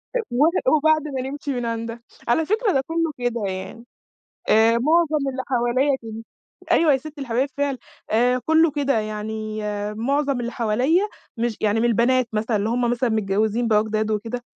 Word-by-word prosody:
أ - - +2
و 250 +5 +3 0.3
وبعد 310 0 +2
ما 265 -3 -3
نمشي 280 +1 -4
من 245 -1 -3
عندها. 230 0 -4 0.3
على 315 +7 +2
فكرة 430 +3 +1
ده 270 - +2
كلّه 330 -1 0
كده 245 -1 -2
يعني، 190 +5 -6 0.6
آآ، 225 +2 +5
معظم 305 0 +2
اللي 260 0 -4
حواليَّ 255 +2 +1
كده. 225 0 -7 0.5
أيوه 320 -3 +5
هي 265 - +3
ست 305 +2 -11
الحبايب 260 0 -1
فعلًا. 280 -2 -1 0.3
آآ، 245 +3 +3
كلّه 320 +1 +4
كده 280 -4 0
يعني 215 0 -4 0.3
معظم 275 +3 0
اللي 240 0 -4
حواليَّ 245 +8 +2 0.4
مش 235 -1 -1
يعني 215 +1 +1
من 235 - +2
البنات 240 +2 +2
مثلًا، 220 +1 0
اللي 205 +1 -1
هُم 240 +1 +1
مثلًا 245 +1 0
متجوزين 215 +2 0
بقى 215 -1 +3
جداد 215 0 -1
وكده، 225 +3 -3
240 Hz, 175 wpm, -22 LUFS, 220-280 Hz, 0.6 s, آآ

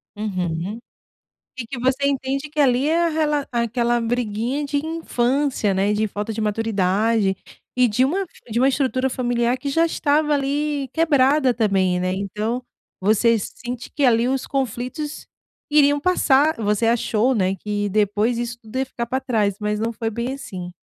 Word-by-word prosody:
Uhum, 185 -1 -3 0.8
e 235 - -4
que 245 +2 -6
você 260 +3 +1
entende 275 +1 -1
que 305 0 -2
ali 270 +2 +3
a 340 +1 +3
rela 300 -2 0
é 235 - +1
aquela 240 +1 0
briguinha 240 +4 -1
de 285 +1 -2
infância, 275 -7 0
né, 200 +2 +1
de 215 +1 +1
falta 210 +2 -4
de 220 - -4
maturidade, 210 -1 +1 0.4
e 250 -1 +4
de 235 +4 +2
uma 375 +9 0 0.3
de 230 +2 0
um 260 - +4
estrutura 265 -1 +1
familiar 245 -1 0
que 280 - -4
já 330 +4 +3
estava 300 -1 +1
ali 285 0 -1
quebrada 285 -4 +3
também, 195 -5 +1
né, 185 0 0
então, 210 +5 -3 0.4
você 220 +4 +3
sente 240 +4 -7
que 290 - 0
ali 235 -1 +4
os 265 0 -1
conflitos 270 +3 -3 0.4
iriam 290 -1 +4
passar, 305 -3 +3
você 210 +1 +1
achou, 235 +1 +2
né, 190 -3 +1
que 205 +1 -2
depois 210 +3 +1
isso 240 0 -4
tudo 220 +3 -10
ia 265 - 0
ficar 235 -2 -5
pra 260 - -1
trás, 210 -6 0
mas 210 0 -1
não 230 +1 -1
foi 225 0 -3
bem 235 +4 -3
assim. 185 -10 -7
240 Hz, 165 wpm, -22 LUFS, 210-275 Hz, 0.8 s, e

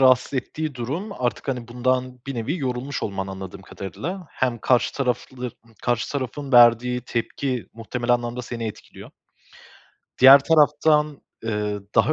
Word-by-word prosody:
rahatsız 130 +1 +4
ettiği 150 +3 -3
durum 145 - -4
artık, 120 - -3
hani, 125 -3 -3
bundan 125 +1 -1
bir 135 - -4
nevi 125 +10 -2
yorulmuş 130 0 -3
olman, 95 -2 -3
anladığım 95 0 -8
kadarıyla. 170 - -6
Hem 125 -2 -1
karşı 125 +2 +2
taraflı 125 -1 -2 0.3
karşı 120 +1 0
tarafın 140 +1 -4
verdiği 120 +1 +6
tepki 125 -1 -3
muhtemelen 120 +2 -2
anlamda 120 +1 -3
seni 115 -1 -5
etkiliyor. 110 - -9 1.1
Diğer 135 +2 +10
taraftan, 150 -1 +3 0.2
ııı, 105 -2 -2
daha 120 +7 +4
125 Hz, 135 wpm, -23 LUFS, 115-140 Hz, 1.1 s, Diğer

